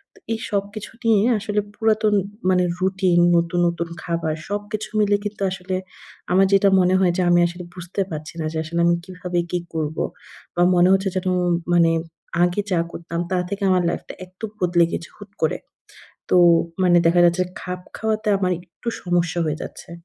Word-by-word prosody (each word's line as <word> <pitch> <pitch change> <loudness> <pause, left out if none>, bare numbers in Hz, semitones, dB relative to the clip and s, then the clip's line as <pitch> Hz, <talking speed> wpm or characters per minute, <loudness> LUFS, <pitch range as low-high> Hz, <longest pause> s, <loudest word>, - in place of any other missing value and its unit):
তো - - -19
এই 225 - -3
সবকিছু 205 +1 -3
নিয়ে 215 -3 +4 0.2
আসলে 210 0 -1
পুরাতন 215 -1 +2 0.4
মানে 180 -1 +3 0.2
রুটিন, 185 -1 +2 0.2
নতুন, 170 +1 0
নতুন, 170 0 -2 0.2
খাবার 165 -2 -2
সবকিছু 205 +1 -4
মিলে 205 -1 +3
কিন্তু 210 0 -5
আসলে 185 0 -4 0.6
আমার 190 +2 +5
যেটা 195 0 +5
মনে 180 +1 +3
হয় 185 -2 +3
যে - - +2
আমি 175 - +5
আসলে 175 +1 -8
বুঝতে 180 +2 -4
পারছি 155 -1 -6
না। - - -2
যে - - -3
আসলে 170 +2 -3
আমি 170 - +4
কিভাবে 180 -1 -3
কি 180 - 0
করব? 155 -1 -3 0.6
বা 175 - +1
মনে 175 +1 +5
হচ্ছে 195 0 +1
যেন 185 0 0 0.4
মানে 170 -1 +5 0.5
আগে 175 +3 +1
যা 175 - +2
করতাম 170 0 -5
তার 180 -1 +1
থেকে 200 0 -4
আমার 185 -1 +3
লাইফটা - - -5
একটু 185 +4 -8
বদলে 175 -1 +3
গেছে 170 - -5
হুট 205 -1 -12
করে। 160 - +1 0.7
তো - - +4 0.5
মানে 175 -1 +5
দেখা 175 +1 +4
যাচ্ছে 175 +1 +3 0.2
খাপ 180 0 -5 0.2
খাওয়াতে 215 -1 -1
আমার 185 -2 +1
একটু 175 +7 -10
সমস্যা 175 -1 0
হয়ে 155 -1 -1
যাচ্ছে। - - -9
180 Hz, 175 wpm, -22 LUFS, 175-200 Hz, 0.7 s, আমার